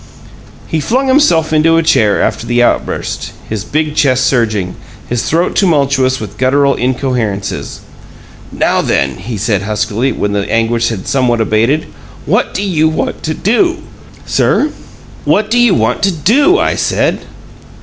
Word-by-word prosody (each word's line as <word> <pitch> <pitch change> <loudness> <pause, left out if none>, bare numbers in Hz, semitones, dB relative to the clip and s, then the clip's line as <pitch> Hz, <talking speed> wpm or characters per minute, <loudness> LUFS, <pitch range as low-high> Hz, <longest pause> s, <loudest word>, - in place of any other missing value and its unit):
He 160 - -2
flung 255 - 0
himself 170 - +3
into 165 +1 +3
a 165 - +2
chair 110 -10 +2
after 115 - -2
the 120 +1 +2
outburst, - - -2
his 105 -2 -4
big 155 +4 -2
chest 130 -4 +2
surging, 110 -8 0 0.3
his 120 -1 -2
throat 170 +3 0
tumultuous 140 -7 +2
with 105 -1 -8
gutteral 140 +2 +3
incoherences. 125 -6 -2 0.7
"Now - - +1
then," 70 -2 0
he 115 -2 -6
said, 105 -1 0
huskily, 110 +5 -1
when 105 -3 -2
the 100 -1 -2
anguish 115 +1 +1
had 110 -5 -6
somewhat 125 -3 +1
abated, 115 +7 +1 0.4
"what - - +1
do 195 - -1
you 160 -5 +1
want 155 - -3
to 155 0 -3
do?" 335 - +1 0.4
"Sir?" 300 - +1 0.5
"What 215 +1 +1
do 240 - +3
you 240 -5 +4
WANT 115 +2 0
to 195 - +2
do, 265 - +3
I - - +1
said." - - 0
130 Hz, 150 wpm, -13 LUFS, 110-165 Hz, 0.7 s, you